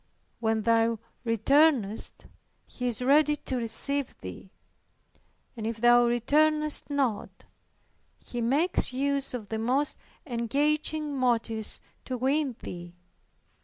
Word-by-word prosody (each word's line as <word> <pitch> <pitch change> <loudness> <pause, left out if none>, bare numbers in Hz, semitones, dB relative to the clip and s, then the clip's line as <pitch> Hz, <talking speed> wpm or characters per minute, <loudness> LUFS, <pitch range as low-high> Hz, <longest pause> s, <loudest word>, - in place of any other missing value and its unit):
When 220 -1 0
thou 230 0 +3 0.3
returnest, 230 -1 +2 0.4
He 250 - -5
is 245 0 -3
ready 295 +3 +4
to 265 - -4
receive 250 +4 -1
thee; 95 - -9 1.1
and 220 -2 -4
if 230 0 -3
thou 240 +1 +5
returnest 300 +6 +1
not, 265 -7 -2 0.8
He 240 - -4
makes 280 +7 +1
use 275 0 -1
of 215 -5 -7
the 220 - -2
most 260 +6 0 0.3
engaging 295 +4 0
motives 230 -4 0 0.2
to 255 - -3
win 270 +1 0
thee. 175 0 -8
250 Hz, 110 wpm, -28 LUFS, 225-285 Hz, 1.1 s, thou